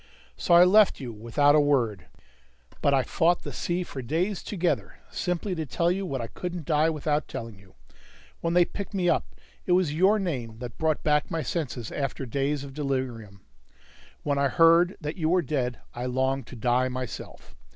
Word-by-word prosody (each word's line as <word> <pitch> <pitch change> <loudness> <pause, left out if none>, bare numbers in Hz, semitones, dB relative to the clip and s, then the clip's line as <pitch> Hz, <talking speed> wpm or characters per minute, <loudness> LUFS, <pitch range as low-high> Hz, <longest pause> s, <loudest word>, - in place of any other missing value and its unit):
So 175 - +3
I 175 - +9
left 205 +2 +5
you 125 -4 -6
without 115 +7 +2
a 150 - +6
word. 125 -9 +1 0.7
But 140 - +3
I 135 -2 +3
fought 170 +8 +1
the - - -6
sea 175 +1 -2
for 135 -6 -7
days 170 - -1
together 180 -4 -2 0.2
simply 180 +2 -2
to 160 -3 -2
tell 170 +6 +1
you 190 +1 -2
what 135 -6 -3
I - - -3
couldn't 175 +6 -6
die 155 0 +3
without 150 -1 -1
telling 115 -4 -7
you. 95 -1 -21 0.6
When 170 0 -1
they 175 -1 +6
picked 200 +2 -7
me 180 -2 +2
up, 165 - -1 0.3
it 180 - +3
was 180 -5 +2
your 190 +7 +4
name 130 - -3
that 120 -1 -8
brought 160 -1 0
back 150 -1 +2
my 165 -1 -2
senses 130 -8 -3
after 135 -1 -3
days 140 +3 -1
of 140 -1 -9
delirium. 130 -8 -3 0.8
When 145 -1 0
I 140 - +3
heard 165 +5 +4
that 150 +3 -4
you 160 -2 0
were 180 0 +3
dead, 125 -4 -2 0.2
I 120 +1 -4
longed 130 +1 -1
to - - -10
die 125 +2 +1
myself. 130 -1 -7
145 Hz, 190 wpm, -26 LUFS, 125-175 Hz, 0.8 s, I